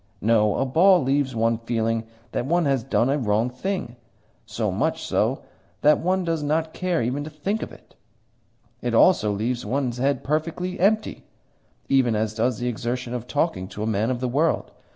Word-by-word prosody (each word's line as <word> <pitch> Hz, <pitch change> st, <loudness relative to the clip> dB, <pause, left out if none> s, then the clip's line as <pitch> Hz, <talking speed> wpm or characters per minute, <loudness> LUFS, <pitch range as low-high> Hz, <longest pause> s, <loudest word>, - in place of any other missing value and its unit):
No; 105 Hz, -1 st, +3 dB
a 135 Hz, -, 0 dB
ball 175 Hz, +5 st, +5 dB
leaves 135 Hz, -1 st, 0 dB
one 115 Hz, 0 st, +1 dB
feeling 115 Hz, -1 st, -1 dB, 0.3 s
that 120 Hz, -, -2 dB
one 170 Hz, +2 st, +2 dB
has 135 Hz, -4 st, +1 dB
done 130 Hz, -2 st, +1 dB
a 140 Hz, +2 st, +1 dB
wrong 110 Hz, +1 st, +1 dB
thing 130 Hz, -3 st, -4 dB, 0.5 s
so -, -, -2 dB
much -, -, -1 dB
so -, -, 0 dB, 0.4 s
that 150 Hz, +1 st, +5 dB
one 185 Hz, +2 st, 0 dB
does 165 Hz, -2 st, -1 dB
not 155 Hz, +2 st, -1 dB
care 180 Hz, -7 st, -1 dB
even 130 Hz, +5 st, -2 dB
to 155 Hz, -, -6 dB
think 190 Hz, +9 st, -3 dB
of -, -, -5 dB
it. -, -, -17 dB, 0.9 s
It -, -, -1 dB
also 110 Hz, -, +5 dB
leaves 115 Hz, +4 st, -2 dB
one's 125 Hz, -2 st, -2 dB
head 135 Hz, 0 st, 0 dB
perfectly 165 Hz, +5 st, -2 dB
empty, 215 Hz, +4 st, +1 dB, 0.6 s
even 130 Hz, -4 st, +3 dB
as 110 Hz, 0 st, -1 dB
does 115 Hz, +1 st, 0 dB
the 120 Hz, -, -3 dB
exertion 120 Hz, +1 st, -3 dB
of 125 Hz, -1 st, -5 dB
talking 145 Hz, -, -1 dB
to 105 Hz, +2 st, -6 dB
a -, -, -1 dB
man 110 Hz, +1 st, 0 dB
of 125 Hz, -1 st, -2 dB
the 130 Hz, -, 0 dB
world. 150 Hz, +6 st, 0 dB
130 Hz, 185 wpm, -24 LUFS, 115-155 Hz, 0.9 s, ball